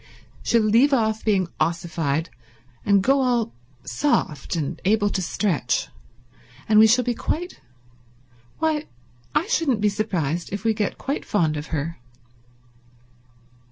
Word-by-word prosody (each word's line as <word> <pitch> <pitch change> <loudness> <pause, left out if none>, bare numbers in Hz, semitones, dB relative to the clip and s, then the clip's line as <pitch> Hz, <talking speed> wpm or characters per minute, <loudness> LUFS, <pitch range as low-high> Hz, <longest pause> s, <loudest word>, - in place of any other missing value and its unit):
She'll 230 -2 +2
leave 235 +7 +4
off 220 -3 +1
being 195 -5 +2
ossified, 165 -2 -1 0.5
and 200 -1 +3
go 270 +3 +3
all 240 -3 +1 0.3
soft 175 - -1
and 155 -4 -3
able 205 +1 +2
to 190 - -1
stretch, 165 -6 -1 0.8
and 215 -1 +5
we 220 - +8
shall 250 +3 +4
get 240 -1 -2
quite—why, 125 - -5 0.5
I 330 - +3
shouldn't 325 - +1
be 210 0 +3
surprised 175 -6 -2
if 200 +1 -4
we 225 -1 +2
get 210 -2 -2
quite 280 +2 -3
fond 165 -7 +1
of 150 +1 -5
her." 160 0 -3
205 Hz, 125 wpm, -23 LUFS, 155-235 Hz, 0.8 s, we